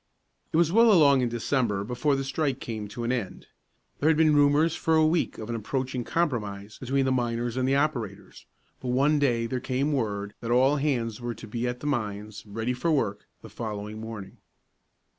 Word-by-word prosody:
It - - +1
was 165 -1 +3
well 230 +3 +6
along 145 -8 +6
in 125 - +1
December 115 -3 0
before 125 +6 0
the 135 - -2
strike 135 0 -1
came 110 -4 -5
to 120 +4 -6
an 120 - 0
end. 120 -7 -3 0.5
There 155 - +3
had 160 - +3
been 155 -1 +4
rumors 145 +3 +4
for 160 - +1
a 160 0 +5
week 160 +2 +1
of 110 - -6
an 120 - -3
approaching 125 +3 -2
compromise 105 -11 -2
between 135 +1 0
the 130 - +1
miners 120 -1 -1
and 130 0 0
the 135 - +3
operators, 125 -9 -2 0.3
but 130 - -7
one 140 +4 +3
day 120 -5 +2
there 125 +2 -2
came 135 +4 -1
word 105 -5 -2
that 115 - -5
all 130 +4 +4
hands 125 -6 -1
were 120 -1 -3
to - - -10
be 120 +3 -2
at 125 0 -4
the - - -7
mines, 105 -6 -3
ready 110 +4 -2
for 130 +7 -1
work, 110 -9 -1 0.2
the - - -10
following 105 -1 -5
morning. 110 -4 -8
125 Hz, 200 wpm, -27 LUFS, 110-145 Hz, 0.5 s, well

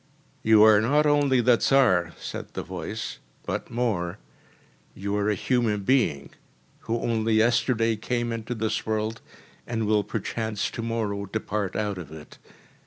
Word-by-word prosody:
“You 110 -1 +6
are 110 -1 +7
not 145 +7 +3
only 145 -3 +3
the 120 0 +4
Tsar,‚ÄĚ 95 -13 +3
said - - -7
the - - -3
voice, - - -6 0.3
“but - - -4
more. 105 -8 -1 0.8
You 100 +1 -3
are 105 0 +1
a 105 - +1
human 110 -1 0
being, 95 - +1 0.5
who 115 - -2
only 115 -1 +1
yesterday 115 0 +2
came 120 +2 -2
into 115 +1 -4
this 110 -1 -1
world, 110 +1 -2 0.5
and 115 -2 -1
will 105 -1 +2
perchance 110 -1 -3
to - - -5
morrow 110 -3 -2
depart 105 -2 -3
out 105 -3 -2
of 80 -4 -9
it. 80 -1 -12
110 Hz, 150 wpm, -26 LUFS, 105-120 Hz, 0.8 s, are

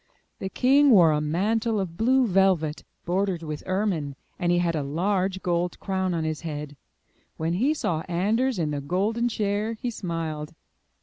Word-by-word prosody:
The 190 - -4
king 275 +6 +4
wore 180 -9 +7
a 150 0 +1
mantle 215 +8 0
of 180 -4 -4
blue 255 +6 +3
velvet, 185 -6 +2 0.2
bordered 185 -1 0
with 155 -2 -5
ermine, 185 -8 -1 0.2
and 175 0 +1
he 175 - +3
had 170 -1 +1
a 155 - 0
large 190 +6 -1
gold 175 0 -1
crown 190 -2 -1
on 165 - -1
his 155 -1 -3
head. 150 -3 -5 0.6
When 160 +1 -1
he 260 - +2
saw 165 - -1
Anders 215 +8 +1
in 155 -4 -1
the 145 -1 -3
golden 210 +10 0
chair, 210 0 -1
he 240 +2 -4
smiled. 165 -6 -4
180 Hz, 170 wpm, -25 LUFS, 160-210 Hz, 0.6 s, wore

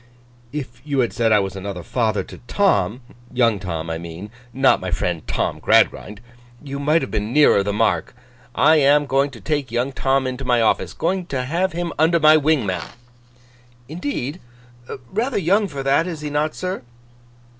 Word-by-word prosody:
'If 130 -5 -6
you 140 -3 0
had 120 - -1
said 115 -1 +1
I 105 - +6
was 95 -1 -2
another 95 -2 -6
father 110 -4 0
to - - -12
Tom—young 120 - 0
Tom, 85 -4 -4
I 80 - -3
mean, 85 +5 -8 0.2
not 135 +2 +3
my 95 - -4
friend 85 0 -1
Tom 65 - -2
Gradgrind—you 120 +5 -1
might 150 +2 +2
have - - -5
been 105 0 -2
nearer 145 -7 +5
the 100 +1 -1
mark. 110 +2 0 0.4
I 160 0 +5
am 145 0 +4
going 135 +1 +1
to 125 -4 -12
take 145 +5 -2
young 120 +3 -1
Tom 135 0 0
into 130 +1 -4
my 125 -2 +2
office. 115 - +1
Going 180 +1 -1
to 130 -5 -2
have 175 +6 -1
him 170 0 -3
under 165 +2 +4
my 155 0 +7
wing, 155 -5 +2
ma'am.' 90 -3 -3 1.0
'Indeed? 145 0 -4 0.7
Rather 240 +6 -1
young 200 +3 +2
for 140 -6 -6
that, 140 +5 +2
is 165 -4 -5
he 150 -1 -5
not, 150 +1 -1
sir? 185 +1 -4
135 Hz, 175 wpm, -21 LUFS, 110-155 Hz, 1.0 s, my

